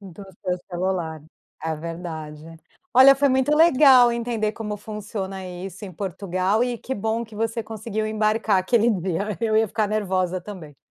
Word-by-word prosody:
Do 195 Hz, 0 st, -11 dB, 0.2 s
seu 180 Hz, -1 st, -1 dB
celular, 175 Hz, -3 st, -2 dB, 0.4 s
é 160 Hz, 0 st, -2 dB
verdade. 160 Hz, -2 st, -7 dB, 0.5 s
Olha, 265 Hz, +2 st, +9 dB
foi 280 Hz, +1 st, +2 dB
muito 265 Hz, +3 st, +2 dB
legal 270 Hz, -6 st, +6 dB
entender 230 Hz, -2 st, -2 dB
como 210 Hz, -2 st, -5 dB
funciona 200 Hz, -3 st, -6 dB
isso 185 Hz, +3 st, -8 dB
em 185 Hz, -, -8 dB
Portugal 190 Hz, +3 st, -1 dB
e 245 Hz, -1 st, -1 dB
que 265 Hz, -, -5 dB
bom 225 Hz, +2 st, -2 dB
que 220 Hz, -1 st, -15 dB
você 225 Hz, +1 st, -2 dB
conseguiu 220 Hz, 0 st, -4 dB
embarcar 215 Hz, -2 st, +1 dB
aquele 230 Hz, +4 st, +2 dB
dia. 190 Hz, +1 st, -2 dB
Eu 220 Hz, -1 st, +1 dB
ia 220 Hz, -, +4 dB
ficar 215 Hz, -1 st, -1 dB
nervosa 185 Hz, -3 st, -1 dB
também. 170 Hz, -8 st, -10 dB
210 Hz, 160 wpm, -23 LUFS, 185-225 Hz, 0.5 s, Olha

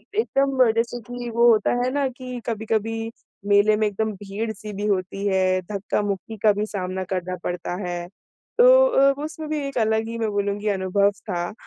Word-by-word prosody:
एकदम 275 Hz, -, +2 dB
जैसे 235 Hz, +1 st, -1 dB
कि 245 Hz, -1 st, -5 dB
वो 235 Hz, +1 st, +4 dB
होता 215 Hz, -2 st, +2 dB
है 255 Hz, -, +1 dB
ना 280 Hz, -1 st, +1 dB
कि 255 Hz, -1 st, -7 dB
कभी-कभी 225 Hz, 0 st, -2 dB, 0.4 s
मेले 205 Hz, +1 st, +5 dB
में 215 Hz, -, +1 dB
एकदम 215 Hz, +2 st, -2 dB
भीड़-सी 210 Hz, +2 st, -6 dB
भी 205 Hz, +2 st, -4 dB
होती 195 Hz, 0 st, -1 dB
है 185 Hz, -1 st, +2 dB
धक्का-मुक्की 205 Hz, +1 st, -2 dB
का 215 Hz, -, +7 dB
भी 210 Hz, +1 st, -1 dB
सामना 185 Hz, -2 st, -4 dB
करना 180 Hz, 0 st, -2 dB
पड़ता 175 Hz, 0 st, -3 dB
है, 175 Hz, 0 st, -4 dB, 0.5 s
तो -, -, +7 dB, 0.4 s
उसमें 310 Hz, 0 st, -7 dB
भी 305 Hz, -1 st, -1 dB
एक 275 Hz, -, -6 dB
अलग 220 Hz, 0 st, +1 dB
ही 230 Hz, 0 st, -5 dB
मैं 220 Hz, -1 st, 0 dB
बोलूँगी 205 Hz, +1 st, -1 dB
अनुभव 200 Hz, +1 st, +2 dB, 0.2 s
था 175 Hz, +1 st, -2 dB
215 Hz, 170 wpm, -23 LUFS, 195-235 Hz, 0.5 s, का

